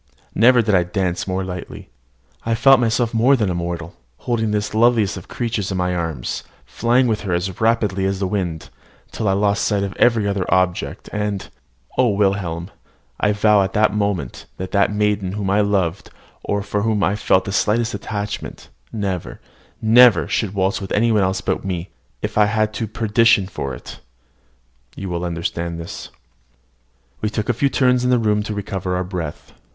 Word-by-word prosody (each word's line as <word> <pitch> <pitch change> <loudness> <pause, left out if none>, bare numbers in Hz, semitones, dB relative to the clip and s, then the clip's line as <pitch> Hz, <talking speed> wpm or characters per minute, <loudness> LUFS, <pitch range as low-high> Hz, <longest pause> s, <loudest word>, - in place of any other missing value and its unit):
Never 120 +2 +5
did 105 -1 0
I 90 - +5
dance 90 0 -2
more 95 0 -1
lightly. 90 -8 -8 0.5
I 115 0 0
felt 135 +2 +6
myself 115 0 +1
more 120 +5 +4
than 105 -8 0
mortal, 85 -1 -4 0.2
holding 115 -3 -1
this 105 0 -1
loveliest 110 -2 +3
of 90 - -9
creatures 115 -5 -3
in 95 - -2
my 90 0 0
arms, 80 -8 -3 0.2
flying, 120 - +2
with 110 -3 0
her 95 -4 -2
as 90 +3 -3
rapidly 105 -4 +1
as 95 0 -1
the 95 - -1
wind, 85 -7 -3 0.4
till 110 - -3
I 95 - +3
lost 100 +2 +1
sight 100 -2 +1
of 100 -1 -4
every 115 -4 +3
other 100 -2 -2
object; 90 -1 0
and 105 -2 -2 0.5
O 130 - +5
Wilhelm, 95 -4 -1 0.5
I 105 - +2
vowed 105 0 +4
at 95 0 -1
that 105 -1 +3
moment, 100 -10 -2
that 95 0 -6
a 100 -1 +4
maiden 105 -2 0
whom 100 -2 -2
I 105 +1 +3
loved, 95 -3 0 0.3
or 100 0 -1
for 105 0 -2
whom 105 -1 +1
I 100 - +2
felt 95 -3 +2
the 100 - -3
slightest 110 +3 +1
attachment, 105 0 -5 0.2
never, 100 -5 -4 0.4
never 120 +2 +6
should 105 -3 -1
waltz 95 +1 0
with 95 - -7
any 115 +2 +3
one 105 -2 +3
else 95 0 0
but - - 0
with - - -14
me, 90 -1 -4 0.3
if - - -1
I 105 - +6
went 110 0 +1
to 115 - -3
perdition 110 -1 +3
for 70 -8 -5
it! - - -11 1.0
you 95 - -6
will 85 0 -3
understand 85 0 -3
this. 85 - -7 1.1
We 105 - 0
took 110 +1 -3
a - - +3
few 140 +5 +1
turns 125 -2 +2
in 125 - +1
the 125 - +4
room 105 -2 +1
to 105 0 -4
recover 95 -2 -3
our 90 - -1
breath. 90 -5 -6
100 Hz, 185 wpm, -20 LUFS, 95-110 Hz, 1.1 s, felt